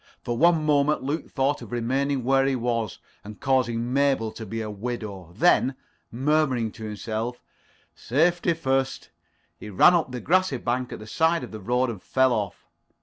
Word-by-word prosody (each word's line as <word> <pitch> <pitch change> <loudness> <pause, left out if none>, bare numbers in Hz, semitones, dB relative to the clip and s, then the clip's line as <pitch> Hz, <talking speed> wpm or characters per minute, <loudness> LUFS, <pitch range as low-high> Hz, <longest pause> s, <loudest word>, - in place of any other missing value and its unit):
For 120 - -2
one 165 +2 +3
moment 150 -1 +2
Luke 145 +5 -3
thought 135 +2 0
of - - -10
remaining 130 +3 -1
where 135 +2 +3
he 135 - +1
was, 115 -5 -2 0.3
and 105 0 -10
causing 125 -2 0
Mabel 135 -5 +2
to 110 0 -9
be 115 +4 -4
a 110 - -3
widow. 105 -5 -6
Then, 140 -5 +3 0.4
murmuring 130 -3 +1
to 110 - -11
himself, 110 +3 -4 0.5
"Safety 170 +6 +1
first," 135 -4 -1 0.5
he 105 - -8
ran 105 - +6
up 170 -6 +1
the 125 - -4
grassy 185 -1 +2
slope 125 +2 -2
at - - -5
the 105 - -10
side 160 +9 +1
of - - -8
the 110 - -7
road 125 +4 0
and 105 -5 -9
fell 130 -1 +2
off. 105 -4 -3
125 Hz, 175 wpm, -25 LUFS, 115-140 Hz, 0.5 s, ran